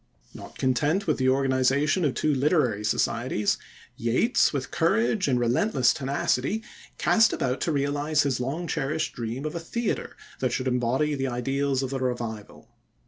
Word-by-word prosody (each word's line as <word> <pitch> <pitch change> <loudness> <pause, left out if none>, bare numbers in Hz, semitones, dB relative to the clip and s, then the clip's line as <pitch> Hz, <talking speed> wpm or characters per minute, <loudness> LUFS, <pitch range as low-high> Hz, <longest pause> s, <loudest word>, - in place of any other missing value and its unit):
Not - - -11
content 145 +9 +1
with 155 - 0
the 130 0 +3
organization 135 +5 +2
of 140 - 0
the - - -3
two 155 - +2
literary 135 - +1
societies, 110 0 0 0.4
Yeats, 125 - +2
with 140 -3 -4
courage 195 +3 +1
and 125 -3 +2
relentless 125 - +2
tenacity, 140 - -1 0.3
cast 225 0 +4
about 130 -3 -1
to 165 - 0
realize 145 +1 +1
his 135 -4 0
long 140 +8 -3
cherished 155 -1 -2
dream 120 +4 -5
of 155 - -3
a 170 - -3
theatre 225 +7 -3 0.2
that 130 -2 0
should 130 - -1
embody 125 +4 +1
the 135 -1 -1
ideals 135 +2 -1
of 130 - -3
the 135 - -2
Revival. 120 -4 -4
135 Hz, 160 wpm, -26 LUFS, 125-155 Hz, 0.4 s, cast